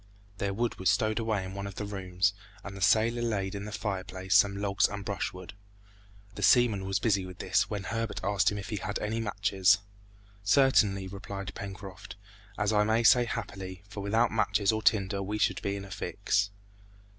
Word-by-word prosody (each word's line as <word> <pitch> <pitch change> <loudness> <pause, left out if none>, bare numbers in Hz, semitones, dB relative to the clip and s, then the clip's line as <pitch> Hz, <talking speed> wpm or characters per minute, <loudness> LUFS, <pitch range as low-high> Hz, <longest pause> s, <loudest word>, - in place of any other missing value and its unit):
Their 100 - -1
wood 115 +4 -2
was 95 - +2
stowed 110 +3 +1
away 110 -4 -1
in 95 - -7
one 100 0 -5
of 100 - -8
the 105 - -4
rooms, 95 -1 0 0.3
and 100 -1 -7
the 95 - -9
sailor 115 +4 +3
laid 100 -5 -1
in 100 0 -5
the 105 - -6
fireplace 95 -2 -3
some 100 0 +5
logs 100 -2 +2
and 100 -1 -6
brushwood. 95 -2 -4 0.8
The 105 - -7
seaman 105 -2 +4
was 95 0 0
busy 100 -3 +1
with 90 0 -9
this, - - +1
when 100 -2 -3
Herbert 115 +2 -3
asked 100 0 +2
him 105 - -4
if 100 - -6
he 105 - -2
had 100 +1 -3
any 110 +2 -2
matches. 100 -3 +2 0.7
"Certainly," 100 -4 +3
replied 100 0 -7
Pencroft, 95 -1 -8 0.4
"and 105 +1 +1
I 105 0 +4
may 110 +2 +2
say 120 +1 +6
happily, 95 -6 -6
for 105 - -7
without 110 +4 +2
matches 105 -2 +2
or 110 0 -2
tinder 100 -2 +2
we 105 +2 -3
should 105 - +1
be 100 0 -2
in 100 0 -6
a 95 - -12
fix." 100 +1 -1
100 Hz, 190 wpm, -29 LUFS, 95-110 Hz, 0.8 s, say